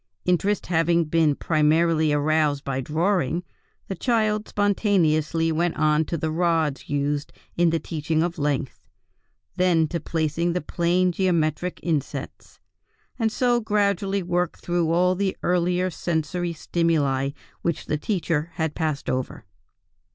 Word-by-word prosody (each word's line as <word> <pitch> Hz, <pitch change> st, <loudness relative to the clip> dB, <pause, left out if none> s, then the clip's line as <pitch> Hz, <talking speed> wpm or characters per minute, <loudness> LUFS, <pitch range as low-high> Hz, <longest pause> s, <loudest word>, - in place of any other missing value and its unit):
Interest 185 Hz, +3 st, +1 dB
having 170 Hz, 0 st, +2 dB
been 155 Hz, -2 st, +2 dB
primarily 155 Hz, +1 st, +2 dB
aroused 145 Hz, -1 st, +1 dB
by 135 Hz, -1 st, -2 dB
drawing, 170 Hz, +2 st, 0 dB, 0.4 s
the -, -, -3 dB
child 215 Hz, +1 st, 0 dB
spontaneously 165 Hz, -6 st, +1 dB
went 170 Hz, +2 st, 0 dB
on 155 Hz, 0 st, +3 dB
to 170 Hz, -, -3 dB
the 160 Hz, 0 st, -2 dB
rods 160 Hz, -5 st, 0 dB
used 145 Hz, +1 st, -1 dB, 0.2 s
in 175 Hz, 0 st, +3 dB
the 165 Hz, -, +1 dB
teaching 160 Hz, 0 st, -1 dB
of 170 Hz, -1 st, -3 dB
length, 145 Hz, -3 st, -1 dB, 0.8 s
then 175 Hz, -3 st, +3 dB
to 170 Hz, +3 st, -3 dB
placing 165 Hz, +1 st, -1 dB
the 180 Hz, -, 0 dB
plane 175 Hz, +3 st, +1 dB
geometric 175 Hz, -1 st, 0 dB
insets, 155 Hz, -5 st, -4 dB, 0.6 s
and 225 Hz, -1 st, +1 dB
so 245 Hz, +1 st, +2 dB
gradually 200 Hz, -2 st, 0 dB
worked 175 Hz, 0 st, -1 dB
through 175 Hz, -2 st, 0 dB
all 180 Hz, +2 st, +3 dB
the 190 Hz, 0 st, -1 dB
earlier 180 Hz, +1 st, +1 dB
sensory 170 Hz, +1 st, -2 dB
stimuli 150 Hz, -5 st, 0 dB, 0.3 s
which 170 Hz, -2 st, -2 dB
the 150 Hz, -, -1 dB
teacher 165 Hz, -4 st, -1 dB
had 160 Hz, -3 st, -1 dB
passed 155 Hz, -4 st, -2 dB
over." 130 Hz, -4 st, -3 dB
165 Hz, 130 wpm, -24 LUFS, 155-180 Hz, 0.8 s, on